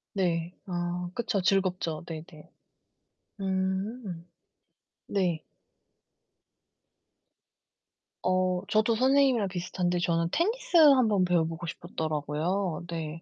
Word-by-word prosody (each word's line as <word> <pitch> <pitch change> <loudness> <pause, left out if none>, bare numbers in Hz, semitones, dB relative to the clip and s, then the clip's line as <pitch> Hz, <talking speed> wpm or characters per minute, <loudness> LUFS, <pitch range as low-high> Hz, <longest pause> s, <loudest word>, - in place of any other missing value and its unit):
네. 175 -2 0
아, 175 0 -3
그쵸. 235 -4 0
즐겁죠. 185 -4 0
네네. 160 -1 -10 0.9
음. 190 0 -2 0.8
네. 175 -5 0 2.8
어, 185 0 +1
저도 215 +2 +3
선생님이랑 260 -3 +3
비슷한데 180 -1 -1
저는 170 -1 +1
테니스 445 - +1
한번 255 - +6
배워 175 -2 +3
보고 165 +1 -5
싶었더라고요. 160 +3 -2
네. 165 -1 -5
180 Hz, 185 characters per minute, -28 LUFS, 170-205 Hz, 2.8 s, 한번